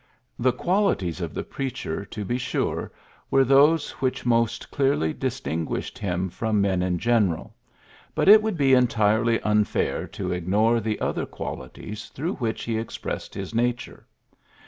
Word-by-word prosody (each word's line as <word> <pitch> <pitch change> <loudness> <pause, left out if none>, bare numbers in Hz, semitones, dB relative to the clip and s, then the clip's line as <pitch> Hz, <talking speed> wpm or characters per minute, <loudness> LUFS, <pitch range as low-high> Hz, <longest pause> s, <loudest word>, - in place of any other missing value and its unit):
The 130 +2 +3
qualities 125 - 0
of 85 -3 -4
the - - -2
preacher, 125 -9 -4
to 105 0 -6
be 120 +6 -1
sure, - - -2 0.4
were 135 - +5
those 145 +4 +4
which 130 -2 -1
most 115 -2 +1
clearly 135 - +1
distinguished 115 - -3
him 95 -2 -1
from 110 +3 -1
men 95 -2 +1
in 90 -1 0
general, 105 -6 +1 0.6
but - - +1
it 215 +2 +9
would 215 -4 -2
be 135 -3 +4
entirely 115 -2 +3
unfair 105 -1 0
to - - -4
ignore 105 +7 +2
the 110 -1 -2
other - - -2
qualities 105 +11 -7
through 165 +8 -3
which 115 -5 -2
he 115 -1 -1
expressed 115 - -5
his 95 +2 -5
nature. 120 +1 -2
115 Hz, 145 wpm, -25 LUFS, 100-130 Hz, 0.6 s, it